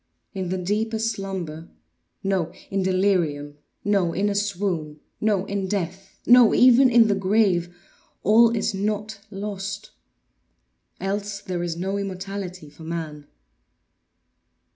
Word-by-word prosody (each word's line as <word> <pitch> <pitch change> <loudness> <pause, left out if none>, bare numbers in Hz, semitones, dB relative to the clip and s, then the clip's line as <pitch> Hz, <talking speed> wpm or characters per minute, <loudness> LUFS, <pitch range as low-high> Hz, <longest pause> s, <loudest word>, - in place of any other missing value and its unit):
In 190 -2 -3
the 185 - -1
deepest 220 +4 -1
slumber—no! 170 - -5 0.2
In 195 0 0
delirium—no! 180 -1 0
In 200 +3 +1
a - - 0
swoon—no! 195 0 -2
In 200 -1 -2
death—no! 195 +5 +3
even 255 +1 +7
in 235 -2 +6
the 205 - +3
grave 190 -3 +1 0.5
all 225 +4 +6
is 220 -2 -1
not 210 +2 -2
lost. 200 0 -5 1.1
Else 200 +1 -3
there 180 -2 -4
is 170 -1 -3
no 195 +3 -2
immortality 190 -3 -5
for 145 - -16
man. 160 -3 -6
195 Hz, 105 wpm, -24 LUFS, 175-205 Hz, 1.1 s, even